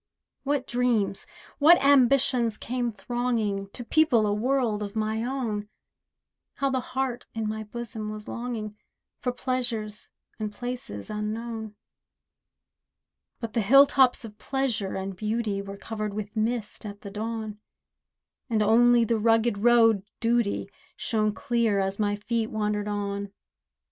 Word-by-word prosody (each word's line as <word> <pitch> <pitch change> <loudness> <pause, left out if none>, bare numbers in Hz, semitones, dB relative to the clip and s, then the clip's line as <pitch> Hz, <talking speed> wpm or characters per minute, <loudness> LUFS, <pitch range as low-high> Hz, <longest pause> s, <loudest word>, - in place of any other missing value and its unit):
What 275 -1 0
dreams, 240 -6 0 0.3
what 325 +4 +8
ambitions 260 -4 +4
came 245 0 -2
thronging 215 -2 -2
To 245 - -7
people 245 -4 +3
a 205 - +1
world 235 -1 +1
of 205 0 -5
my 220 +1 -1
own! 230 -5 -2 0.9
How 275 -1 0
the 260 - +1
heart 255 -1 -3
in 220 -1 -1
my 215 0 -4
bosom 220 -1 -5
was 215 0 -7
longing, 230 -3 -4 0.4
For 250 - -1
pleasures 240 -4 -3 0.3
and 215 -1 -3
places 240 - -5
unknown. 220 +1 -4 1.6
But 230 -2 -5
the 230 - +2
hill 275 +7 +8
tops 260 -4 +3
of 210 -1 -11
pleasure 260 -8 -1
and 190 0 -4
beauty 215 0 -1
Were 200 0 -8
covered 215 -1 -4
with 210 +1 -5
mist 220 0 -1
at 205 -1 -8
the 200 - -8
dawn; 215 0 -4 0.9
And 220 -2 +2
only 235 +2 +5
the 225 0 +1
rugged 225 -1 +3
road 225 -2 +5 0.2
Duty 235 -2 +1 0.3
Shone 215 -2 0
clear, 235 -3 0
as 195 +1 -1
my 205 -1 +1
feet 225 +2 -2
wandered 210 -1 -1
on. 200 -1 -3
225 Hz, 135 wpm, -27 LUFS, 210-245 Hz, 1.6 s, what